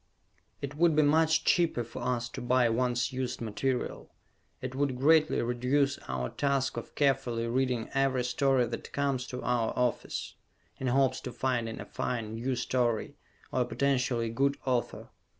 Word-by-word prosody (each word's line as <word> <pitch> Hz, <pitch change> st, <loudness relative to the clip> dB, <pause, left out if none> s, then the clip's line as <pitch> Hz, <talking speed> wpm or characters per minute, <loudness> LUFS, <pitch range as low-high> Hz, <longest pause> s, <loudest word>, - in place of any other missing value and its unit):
It 140 Hz, 0 st, -3 dB
would 165 Hz, +1 st, +3 dB
be 155 Hz, -, +5 dB
much 160 Hz, +2 st, +3 dB
cheaper 170 Hz, -8 st, +3 dB
for 115 Hz, -, -8 dB
us 120 Hz, -1 st, -1 dB
to -, -, -7 dB
buy 125 Hz, 0 st, +3 dB
once 125 Hz, +2 st, 0 dB
used 130 Hz, 0 st, -3 dB
material. 125 Hz, +3 st, -2 dB, 0.5 s
It 130 Hz, 0 st, -5 dB
would 135 Hz, -1 st, 0 dB
greatly 155 Hz, +3 st, +4 dB
reduce 130 Hz, +4 st, +1 dB
our 65 Hz, -1 st, -2 dB
task 140 Hz, -2 st, 0 dB
of -, -, -7 dB
carefully 130 Hz, -5 st, +1 dB
reading 125 Hz, -1 st, 0 dB
every 135 Hz, -2 st, +2 dB
story 130 Hz, 0 st, +2 dB
that -, -, -7 dB
comes 140 Hz, -3 st, 0 dB
to 125 Hz, -, -6 dB
our 120 Hz, -2 st, +1 dB
office, 125 Hz, -1 st, -1 dB, 0.5 s
in 130 Hz, -, -2 dB
hopes 130 Hz, 0 st, +2 dB
to 125 Hz, -, -6 dB
finding 120 Hz, -2 st, -1 dB
a -, -, -6 dB
fine, 115 Hz, -3 st, -3 dB
new 125 Hz, +3 st, -2 dB
story, 120 Hz, -2 st, 0 dB, 0.4 s
or -, -, +1 dB
a -, -, +2 dB
potentially 125 Hz, -4 st, 0 dB
good 140 Hz, +4 st, +1 dB
author. 125 Hz, -3 st, -1 dB
130 Hz, 160 wpm, -30 LUFS, 120-140 Hz, 0.5 s, be